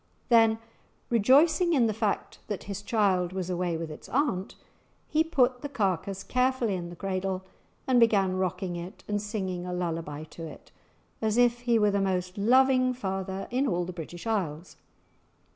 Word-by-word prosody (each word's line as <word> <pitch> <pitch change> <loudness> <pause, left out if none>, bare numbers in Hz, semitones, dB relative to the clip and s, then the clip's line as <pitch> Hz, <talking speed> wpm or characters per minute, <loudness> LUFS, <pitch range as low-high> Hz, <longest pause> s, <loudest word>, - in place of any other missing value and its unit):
Then 225 -2 +5 0.5
rejoicing 300 - +4
in 255 -6 +4
the 220 - +1
fact 215 -1 -2
that 205 - -4
his 200 -1 -5
child 195 -5 +1
was 185 -1 -3
away 175 -2 -1
with 160 -1 -5
its 150 - -11
aunt, 240 -9 0 0.5
he 315 +1 +2
put 255 -6 +2
the 285 - -5
carcase 195 - -1
carefully 255 -3 +1
in 175 -2 -4
the 175 - -9
cradle 190 0 -2 0.4
and 255 -2 +4
began 200 -5 +4
rocking 185 -1 -2
it 175 +2 -8
and 205 -1 -1
singing 190 -4 -3
a - - -3
lullaby 165 -4 -3
to 165 +1 -9
it, - - -13 0.5
as 220 0 +1
if 240 0 +4
he 240 -1 +2
were 210 -1 +3
the 200 0 +1
most 185 -1 -1
loving 255 +3 +4
father 195 -3 -4
in 260 +3 +1
all 175 -4 0
the 180 - -6
British 175 +2 -8
Isles. 185 -7 -2
200 Hz, 170 wpm, -28 LUFS, 180-240 Hz, 0.5 s, Then